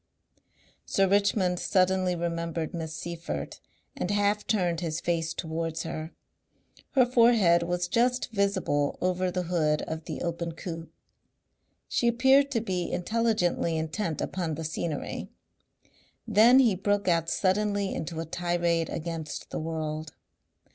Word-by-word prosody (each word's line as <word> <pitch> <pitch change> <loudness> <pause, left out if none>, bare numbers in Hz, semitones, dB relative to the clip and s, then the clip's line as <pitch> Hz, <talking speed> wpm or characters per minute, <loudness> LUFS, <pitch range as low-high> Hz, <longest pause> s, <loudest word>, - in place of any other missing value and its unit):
Sir 195 - +2
Richmond 195 -2 +2
suddenly 185 -1 +2
remembered 170 -1 -3
Miss 160 -2 -4
Seyffert 170 - -5 0.4
and 180 - -3
half 205 0 +1
turned 180 -6 +1
his 165 -2 -2
face 165 -2 -1
towards 165 -1 -3
her. 160 0 -5 0.8
Her 260 -4 +5
forehead 230 -8 +5
was 175 +1 -1
just 245 +5 +1
visible 195 -9 0
over 185 0 0
the 180 0 -2
hood 160 -3 +1
of 160 0 -5
the - - -5
open 170 -1 -3
coupe. 165 0 -7 1.0
She 240 - +1
appeared 265 +4 +4
to 235 -5 0
be 185 -5 -2
intelligently 180 -5 0
intent 160 +1 -2
upon 170 -4 -2
the 160 - -5
scenery. 155 -1 -4 1.0
Then 235 +5 +6
he 245 -6 +5
broke 200 +2 0
out 165 -2 +2
suddenly 200 +1 +1
into 160 +1 -4
a 165 - -3
tirade 170 0 0
against 160 -2 -5
the - - -3
world. 155 -1 -4
175 Hz, 130 wpm, -28 LUFS, 165-205 Hz, 1.0 s, Then